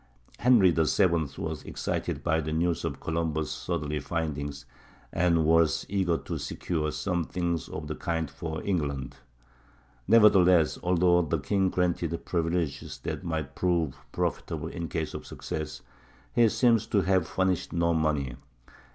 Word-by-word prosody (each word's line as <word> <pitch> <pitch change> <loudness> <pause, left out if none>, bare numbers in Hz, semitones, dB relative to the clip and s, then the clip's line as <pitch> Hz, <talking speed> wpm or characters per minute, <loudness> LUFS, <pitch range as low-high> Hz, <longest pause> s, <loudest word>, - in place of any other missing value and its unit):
Henry 115 -6 +6
VII 80 +4 +3 0.3
was 80 -2 -4
excited - - -3
by 80 -1 +2
the 80 0 -4
news 85 +1 0
of - - -3
Columbus' 80 -1 -2
southerly 75 -4 -3
findings, 75 -2 -3 0.5
and 85 -2 +2
was 80 0 +3
eager 95 -4 +1
to - - -5
secure 75 -3 -2
something 85 -1 -1
of 80 - -5
the 75 - -4
kind 80 0 -2
for 80 +2 -5
England. 70 -9 -2 0.9
Nevertheless, 95 -7 +5
although 90 0 +3
the 80 0 0
king 95 +7 +1
granted 90 -2 -1
privileges 85 -4 -2
that - - -4
might 80 -5 -3
prove 85 -6 0 0.2
profitable 80 0 -2
in 85 0 -5
case 80 -1 -3
of - - -7
success, 75 -1 -5 0.5
he 120 -2 +5
seems 115 -2 +3
to 100 - +2
have 95 -2 +2
furnished 95 -2 0
no 85 0 +1
money. 75 -6 0
85 Hz, 135 wpm, -28 LUFS, 80-90 Hz, 0.9 s, Henry